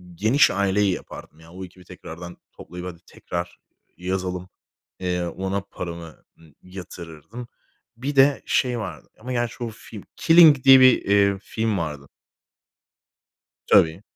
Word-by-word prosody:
Geniş 115 - +3
Aile'yi 100 0 +1
yapardım. 80 - -10
Ya, 80 +1 -17
o 95 +1 -8
ekibi 90 0 -17
tekrardan 85 +2 -10 0.2
toplayıp, 90 +1 -9
hadi, 85 -1 -10
tekrar 85 0 -7 0.4
yazalım. 90 0 -4 0.5
Eee, 90 -1 -2
ona 95 +3 -3
paramı, 85 -4 -9 0.2
ııı, 80 -3 -20
yatırırdım. 90 +4 -10 0.5
Bir 140 +4 -4
de 135 +1 +4
şey 125 -2 0
vardı 90 -7 -8
ama 125 +3 -8
gerçi 120 -1 -2
o 115 - -3
film. 110 -2 -12
Killing 165 -5 +6
diye 135 -1 +8
bir, 130 -1 +6
eee, 100 -1 +2
film 110 0 -3
vardı. 75 -4 -5 1.6
Tabii. 80 +4 +4
95 Hz, 130 wpm, -23 LUFS, 85-115 Hz, 1.6 s, diye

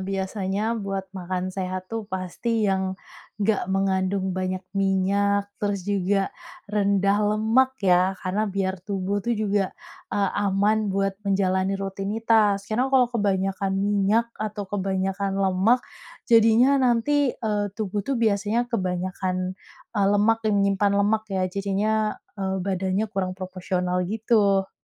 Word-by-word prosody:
biasanya 195 +2 -2
buat 195 -2 -3
makan 185 0 -4
sehat 185 -1 -4
tuh 225 -2 -4
pasti 210 +4 -2
yang, 190 -1 0 0.5
nggak 205 -2 +1
mengandung 190 0 0
banyak 185 0 -2
minyak, 200 +1 +1
terus 205 -2 -1
juga 195 0 0 0.4
rendah 200 -1 +2 0.2
lemak 235 +5 +2
ya 185 0 +4
karena 195 +4 0
biar 195 -1 -2
tubuh 200 0 -1
tuh 235 +4 -1
juga, 205 -3 0 0.4
eee, 200 -2 +1 0.2
aman 205 +2 +2
buat 195 0 -1
menjalani 190 0 +1
rutinitas, 200 +1 +1
karena 245 +4 +1
kalau 260 -3 +3
kebanyakan 195 -3 0
minyak 205 +3 +1
atau 210 -1 -3
kebanyakan 195 0 -1
lemak 195 +6 +3 0.4
jadinya 230 +3 +5
nanti, 260 +2 +2
eee, 210 -2 -1
tubuh 205 -1 -3
tuh 275 - 0
biasanya 220 -1 +1
kebanyakan, 185 -2 -2 0.3
eee, 205 -3 +1
lemak 215 +2 +3
yang 215 - +2
menyimpan 200 0 +2
lemak 215 +2 +1
ya 190 -2 -1
jadinya, 205 +3 0 0.2
eee, 190 0 -1
badannya 190 +2 -1
kurang 190 -3 -2
proporsional 180 -1 -2
gitu. 205 -2 +2
195 Hz, 125 wpm, -24 LUFS, 190-215 Hz, 0.5 s, jadinya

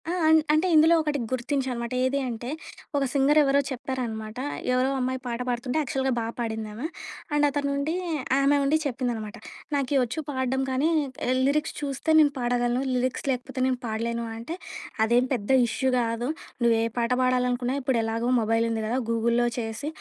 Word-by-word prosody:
ఆ! - - 0 0.2
అన్ 320 0 +7 0.2
అంటే 310 +4 +3
ఇందులో 320 +2 +7
ఒకటి 300 -2 -1
గుర్తించా 260 +1 -1
అనమాట. 235 0 -4
ఏది 265 +2 +1
అంటే 240 0 -5 0.5
ఒక 280 - +2
సింగర్ 285 +2 +4
ఎవరో 280 -1 +3
చెప్పారనమాట. 235 -4 -4 0.4
ఎవరో 255 +1 +2
అమ్మాయి 260 0 -1
పాట 235 -1 -3
పాడుతుంటే 250 +3 -1
యాక్చువల్‌గా 270 -3 -1
బా - - -1 0.2
పాడింది 220 -2 -3
ఆమా. 235 +8 -5 0.5
అండ్ 295 0 +4
అతను 285 0 -1
ఉండి 290 +3 -1 0.5
ఆమె 280 +1 +4
ఉండి 285 +3 +3
చెప్పిందనమాట. 240 -5 -3 0.4
"నాకేవచ్చు 270 0 0
పాడడం 260 -1 -1
గానీ 265 +5 +1 0.6
లిరిక్స్ 300 +2 0
చూస్తే 280 +2 -3
నేను 295 -2 +5
పాడగలను. 245 0 +1
లిరిక్స్ 250 0 -1
లేకపోతే 255 +1 -4
నేను 255 -1 0
పాడలేను" 230 +1 -2
అంటే 235 +9 -5 0.5
అదేం 240 +3 +3
పెద్ద 205 -5 -3 0.2
ఇష్యూ 260 +4 0
గాదు. 235 +2 -1 0.3
నువ్వే 230 -1 +4 0.2
పాట 235 0 0
పాడాలనుకున్నా 250 0 +1
ఇప్పుడు 255 -2 +1
ఎలాగో 225 +2 -1
మొబైల్ 225 +1 +2
ఉంది 220 -1 -1
గదా! 235 +4 0
గూగుల్‌లో 235 +1 +2
చేసి 225 +5 -4
250 Hz, 160 wpm, -26 LUFS, 235-275 Hz, 0.6 s, అన్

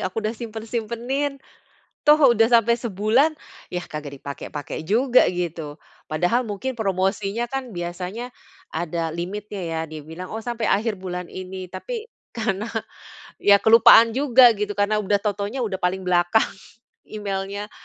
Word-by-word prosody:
aku 215 +3 -5
udah 215 - 0
simpen-simpenin, 235 +5 -3 0.7
toh 300 +1 +6 0.2
udah 225 +1 +3
sampai 235 -1 +5
sebulan 235 +7 +1 0.3
ya, 180 0 -3
kagak 145 -2 -7
dipakai-pakai 140 +2 -6
juga 240 +9 +3
gitu. 170 -4 -4 0.3
Padahal 175 +10 +1
mungkin 230 +3 -4
promosinya 200 +1 -1
kan 265 0 -5
biasanya 180 +8 -5 0.4
ada 165 0 -2
limitnya, 200 +3 -5
ya 165 -1 -3
dia 155 -1 -9
bilang, 165 +6 -9
"Oh 225 - -4
sampai 235 -1 -3
akhir 210 0 +1
bulan 180 -1 -6
ini," 185 0 -7
tapi 450 - -6 0.2
karena 220 -2 -2 0.8
ya 200 0 +7
kelupaan 225 +1 +7
juga 255 -4 +6
gitu, 205 0 -3
karena 210 +1 +2
udah 205 +1 +2
tau-taunya 205 +4 -2
udah 190 -2 -3
paling 185 +1 0
belakang 175 +4 +3 0.6
emailnya, 200 0 -4
205 Hz, 135 wpm, -23 LUFS, 180-235 Hz, 0.8 s, ya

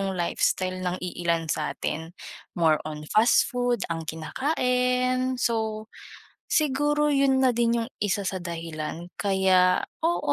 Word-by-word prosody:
'yong 195 -1 -2
lifestyle 185 +1 0
ng 180 0 -2
iilan 170 -2 -2
sa'tin, 160 +2 -3 0.4
more 160 -3 +3
on 150 0 -7
fast 220 +3 +5
food 245 -3 0
ang 165 -1 -5
kinakain. 250 - 0
So, 220 -3 -1 0.6
siguro 295 0 +2
'yon 275 -2 +3
na 255 -3 +3
din 235 0 +2
'yong 230 +2 -5
isa 200 0 0
sa 190 - -3
dahilan 165 -1 -5
kaya, 190 -2 +3 0.2
oo, 340 +1 +1
200 Hz, 130 wpm, -26 LUFS, 170-250 Hz, 0.6 s, fast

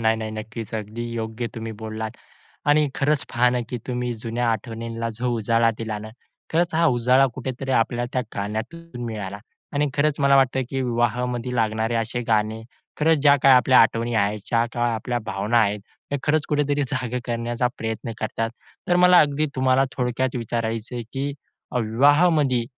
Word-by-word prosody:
नाही, 110 0 +3
नाही, 110 -1 -4
नक्कीच. 110 +1 -6
अगदी 110 +2 -4
योग्य 115 +1 -3
तुम्ही 115 -1 -5
बोललात 110 0 -6 0.5
आणि 150 0 +4
खरंच 145 0 +1
पहा 125 0 +4
ना 125 - 0
की 125 - -3
तुम्ही 125 -1 -2
जुन्या 115 +1 -2
आठवणींना 115 +1 -4
जो 125 0 0
उजाळा 115 +1 +2
दिला 110 -2 -4
ना. 110 - -8 0.4
खरंच 170 +1 +1
हा 165 +1 +3
उजाळा 125 +3 +4
कुठेतरी 130 +1 -4
आपल्या 120 +1 0
त्या 130 - +1
गाण्यातून 120 +8 -5
मिळाला 105 -3 -5 0.4
आणि 145 +1 +2
खरंच 150 0 +1
मला 140 -1 +5
वाटतं 130 -1 +3
की 135 -1 -2
विवाहामध्ये 120 0 -1
लागणारे 110 0 0
असे 115 +2 -1
गाणे, 110 0 +1 0.4
खरंच 160 +1 +4
ज्या 145 0 +6
काही 135 -1 +7
आपल्या 125 +1 +5
आठवणी 115 +1 +3
आहेत, 105 0 +1
ज्या 115 0 +2
काय 120 -1 +1
आपल्या 120 +2 -2
भावना 105 +5 +1
आहेत, 105 -1 +1 0.3
हे 145 - +1
खरंच 155 +1 +1
कुठेतरी 145 -1 +1
जागं 125 -2 -2
करण्याचा 120 +1 -1
प्रयत्न 115 +1 -4
करतात. 115 +1 -2 0.4
तर 175 - +3
मला 180 0 +7
अगदी 150 +1 +2
तुम्हाला 130 0 +3
थोडक्यात 125 0 -1
विचारायचं 115 0 -3
आहे 120 - -3
की 140 +1 -2 0.5
विवाहामध्ये 140 +2 +3
120 Hz, 165 wpm, -23 LUFS, 110-135 Hz, 0.5 s, काही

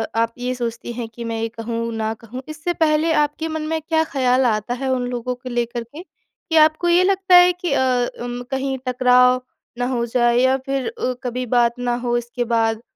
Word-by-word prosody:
आप 230 0 +1
ये 250 +1 -2
सोचतीं 235 -1 -4
हैं 235 -1 -5
कि 235 +1 -9
मैं 230 -1 -3
ये 225 - 0
कहूँ 230 0 -3
न 220 0 -1
कहूँ 235 +3 -8
इससे 310 +3 -3
पहले 315 0 +2
आपके 300 +1 0
मन 315 -1 -3
में 320 0 -1
क्या 320 +1 +1
ख़्याल 260 -4 +1 0.3
है 265 +2 -2
उन 250 -1 0
लोगों 250 0 -3
को 250 +1 -9
लेकर 240 0 -2
के? 285 +8 -11
कि 350 -2 -9
आपको 310 +2 +4
ये 350 +1 +5
लगता 380 -1 +3
है 355 0 +7
कि 355 -2 -4
अ, - - +2 0.4
अम 245 0 -5
कहीं 270 0 -1
टकराव 250 0 +4 0.4
ना 245 - -1
हो 240 -2 -1
जाए, 240 0 +2
या 260 +1 +3
फिर 270 -3 -2
अ, 250 +2 -2
कभी 250 0 -3
बात 240 0 +2
ना 245 -1 0
हो 240 -1 -1
इसके 240 +1 -3
बाद, 225 -1 +1
250 Hz, 210 wpm, -21 LUFS, 235-300 Hz, 0.4 s, है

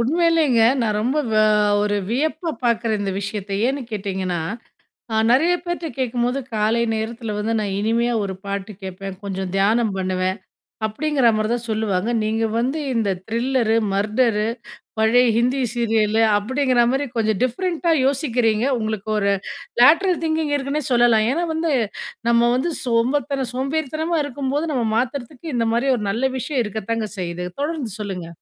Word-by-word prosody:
உண்மையிலேங்க 310 -2 +3 0.2
நான் 215 -2 0
ரொம்ப 260 +6 0 0.7
ஒரு 205 0 0
வியப்பு 315 +7 -1 0.2
பாக்குற 230 -1 +1
இந்த 200 -1 -1
விஷயத்தை 200 -1 -4
ஏனு 275 +2 -1
கேட்டீங்கன்னா 190 -4 -2 0.9
நிறைய 325 +8 +4
பேர்ட்ட 345 -1 -3
கேக்கும்போது 245 +1 0 0.2
காலை 220 +2 +2
நேரத்துல 225 0 -4
வந்து 220 +2 -1
நான் 200 -2 -2
இனிமையா 235 +3 +1
ஒரு 195 -1 -3
பாட்டு 200 +1 -4
கேப்பேன். 190 +1 -6
கொஞ்சம் 190 -1 -3
தியானம் 215 +2 +2
பண்ணுவேன் 185 +1 -1 0.5
அப்படிங்கற 275 +4 0
மாதிரி 215 0 0
தான் 240 0 -2
சொல்லுவாங்க. 215 -1 0
நீங்க 220 +1 0
வந்து 260 +6 0 0.2
இந்த 220 -4 +1 0.2
த்ரில்லர் 235 0 +1 0.2
மர்டர் 215 +2 +1 0.6
பழைய 235 +3 +4
ஹிந்தி 250 +3 +2
சீரியல் 220 -2 +1 0.2
அப்படிங்கற 255 +2 +1
மாதிரி 270 +2 0
கொஞ்சம் 215 -3 +1
டிஃபரெண்ட் 335 +8 -1 0.2
யோசிக்கிறீங்க. 245 -5 +1
உங்களுக்கு 215 -2 -3
ஒரு 200 -1 +2 0.5
லேட்டரல் 340 +7 +5
திங்கிங் 315 -2 0
இருக்குன்னு 285 +2 -2
சொல்லலாம். 235 -3 +4
ஏன்னா 335 +5 0
வந்து 320 0 0 0.6
நம்ம 235 0 +4
வந்து 305 +7 0
சோம்ப, 245 +4 +2 0.3
சோம்பேறித்தனமா 310 +5 -1
இருக்கும்போது 285 +3 -2
நம்ம 245 -3 0
மாத்துறதுக்கு 260 +4 -3
இந்த 230 -1 +1
மாதிரி 245 +4 +1
ஒரு 215 - -4
நல்ல 255 +5 0
விஷயம் 260 -1 -1
இருக்கத்தான் 220 +2 -3
செய்யுது. 175 0 -4 0.2
தொடர்ந்து 290 -7 -2
சொல்லுங்க. 190 -5 -5
235 Hz, 135 wpm, -21 LUFS, 210-270 Hz, 0.9 s, லேட்டரல்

